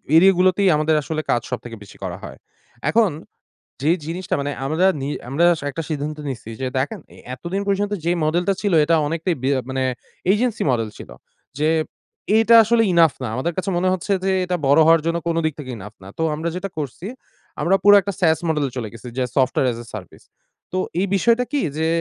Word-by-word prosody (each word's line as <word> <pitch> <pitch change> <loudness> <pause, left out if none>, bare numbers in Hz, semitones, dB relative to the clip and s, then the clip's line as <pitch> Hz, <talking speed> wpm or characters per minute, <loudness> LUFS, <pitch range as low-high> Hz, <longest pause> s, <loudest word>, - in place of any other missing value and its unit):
এরিয়াগুলোতেই 185 +2 +5
আমাদের 155 +1 +2
আসলে 155 +2 -3
কাজ 120 - +2
সবথেকে 120 -2 -5
বেশি 100 - -15
করা - - -4
হয়। - - -9 0.5
এখন 220 -5 +3 0.7
যে 155 - +2
জিনিসটা 175 +3 -3
মানে 145 - -2
আমরা 160 +7 +2
নি 135 - -3 0.2
আমরা 145 +6 +1 0.3
একটা 155 +4 -5
সিদ্ধান্ত 150 -1 -3
নিচ্ছি 120 -4 -6
যে 130 - -1
দেখেন, 175 +10 -2
এ - - -15 0.2
এতদিন 175 +9 -4
পর্যন্ত 205 +1 0
যে 170 - +1
মডেলটা 175 +5 +1
ছিল, 205 -2 0
এটা 165 - +2
অনেকটাই 165 +3 -1
বে 135 - +1 0.2
মানে 130 0 -2 0.5
agency 225 +2 0
মডেল 115 -3 0
ছিল। - - -10 0.5
যে 155 +1 +2 0.7
এটা 225 +1 +5
আসলে 230 +1 +3
enough 165 -3 +4
না। 125 - -2
আমাদের 150 +7 -1
কাছে 185 +1 -2
মনে 180 +2 +1
হচ্ছে 185 +2 -2
যে 190 - +2
এটা 180 0 -1
বড় 140 +3 +5
হওয়ার 165 0 +6
জন্য 165 - +1
কোন 165 - 0
দিক 155 -2 0
থেকে 135 -4 -7
enough 105 +2 -11
না। 95 - -11
তো - - -1
আমরা 160 +2 -3
যেটা 195 +2 -4
করছি, 150 +5 -5 0.5
আমরা 190 +3 +3
পুরো 205 - +8
একটা 200 +1 -4
SAS 160 -4 +3
মডেলে 150 -3 0
চলে 115 -4 -3
গেছি। 115 +2 -10
যে - - +2
software 130 -1 +2
as 115 - -7
a - - -17
service 95 -4 -12 0.5
তো 185 - -1 0.2
এই 195 - +1
বিষয়টা 235 +5 +3
কি 290 - +1 0.2
যে 160 - +1
165 Hz, 200 wpm, -21 LUFS, 135-190 Hz, 0.7 s, পুরো